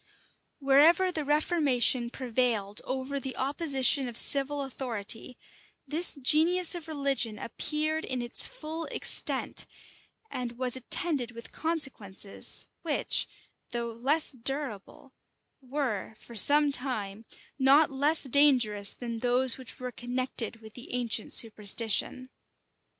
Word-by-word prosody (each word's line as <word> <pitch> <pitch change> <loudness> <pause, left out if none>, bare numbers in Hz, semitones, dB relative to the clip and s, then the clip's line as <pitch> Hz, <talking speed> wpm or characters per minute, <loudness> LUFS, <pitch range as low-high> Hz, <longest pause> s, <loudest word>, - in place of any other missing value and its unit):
Wherever 315 +7 +3
the 315 -3 -4
reformation 285 -5 +1
prevailed 235 -5 -2
over 265 +2 -4
the 265 -1 -7
opposition 275 -1 +2
of 235 -2 -7
civil 280 +1 +1
authority, 240 -3 -4 0.5
this 320 +6 +4
genius 320 +7 +3
of 345 -3 -7
religion 275 -7 -2
appeared 305 +8 -3
in 255 -1 -3
its 240 0 +4
full 325 -8 -7
extent, - - 0 0.6
and 245 - -5
was 255 -1 +1
attended 260 -1 -2
with 235 0 -11
consequences, 265 - +1
which, - - 0 0.4
though 235 -1 -4
less 275 +7 -1
durable, 260 -2 -4 0.5
were, 255 -6 -4
for 235 - -14
some 290 +7 +5
time, 225 -6 -2 0.4
not 280 +3 +4
less 290 +4 +2
dangerous 250 -7 +3
than 235 -2 -7
those 250 +1 +1
which 255 -3 -9
were 250 0 -6
connected 245 -2 -4
with 220 -1 -14
the 245 - -10
ancient 235 -3 -2
superstition. 225 +3 +1
260 Hz, 115 wpm, -28 LUFS, 235-290 Hz, 0.6 s, some